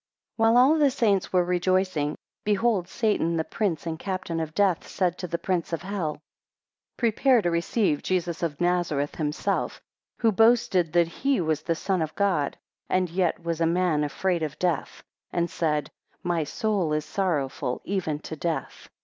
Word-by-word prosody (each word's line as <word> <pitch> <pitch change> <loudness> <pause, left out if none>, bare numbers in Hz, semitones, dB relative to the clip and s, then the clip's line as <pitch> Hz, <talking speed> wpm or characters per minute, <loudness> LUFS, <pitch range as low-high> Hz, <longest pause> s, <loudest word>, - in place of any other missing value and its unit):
WHILE 225 +1 +4
all 280 +6 +6
the 290 -2 +5
saints 215 -8 +1
were 180 -1 +4
rejoicing, 180 -4 +1 0.3
behold 210 -3 +1
Satan, 185 -7 0
the 160 - +1
prince 175 -4 -2
and 160 -1 -3
captain 185 -4 -3
of 160 -1 -4
death, 195 -4 +2
said 180 -2 0
to 180 - -4
the 170 0 -2
prince 170 -1 -2
of 165 - -2
hell, 185 -6 -2
2 - - -22 0.8
Prepare 235 +1 +3
to 175 - +1
receive 170 -1 +1
Jesus 175 -2 -1
of 155 -4 -2
Nazareth 175 -5 0
himself, 150 -1 -1 0.4
who 225 - +3
boasted 210 -6 +3
that 170 -1 +4
he 270 +10 0
was 160 -3 0
the 165 +1 -1
Son 185 +1 -1
of 155 -1 -3
God, 185 -8 +1 0.3
and 185 -2 +1
yet 175 -1 0
was 170 -1 -2
a 165 - +4
man 170 -3 +2
afraid 170 +4 -1
of 155 -2 -3
death, 175 -5 -2 0.3
and 170 0 -1
said, 150 -3 -1 0.3
My 170 -3 0
soul 195 -2 0
is 150 0 -1
sorrowful 150 -7 -1
even 180 -6 -1
to 160 - -6
death. 165 +1 -4
175 Hz, 170 wpm, -26 LUFS, 160-195 Hz, 0.8 s, all